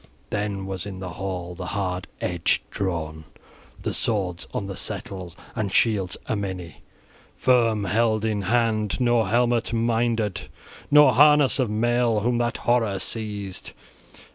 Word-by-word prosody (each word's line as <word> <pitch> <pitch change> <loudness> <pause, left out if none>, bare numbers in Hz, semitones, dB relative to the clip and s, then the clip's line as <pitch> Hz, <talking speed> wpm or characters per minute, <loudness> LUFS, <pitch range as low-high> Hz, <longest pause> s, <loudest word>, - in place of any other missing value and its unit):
Then 100 -2 -2
was 95 0 -5
in 95 -2 -7
hall 90 -1 -5
the 90 0 -6
hard 90 -2 -2
edge 85 -2 0
drawn, 80 -5 -3 0.6
the - - -2
swords 95 -6 -2
on 100 - -3
the 100 -1 -5
settles, 90 -3 -4
{19a} - - -21 0.2
and 110 -4 -2
shields 100 -4 +2
a - - -1
many 95 -5 -5 0.6
firm 115 -5 +3
held 110 +2 +1
in 105 -2 0
hand: 110 0 +1
nor 120 -2 +3
helmet 120 0 +1
minded 115 -3 0 0.4
nor 150 -3 +7
harness 145 +1 +5
of 125 -4 +1
mail, 115 0 +2
whom 120 +2 +1
that 120 0 0
horror 115 -5 +2
seized. 105 -3 -4
105 Hz, 140 wpm, -24 LUFS, 95-120 Hz, 0.6 s, nor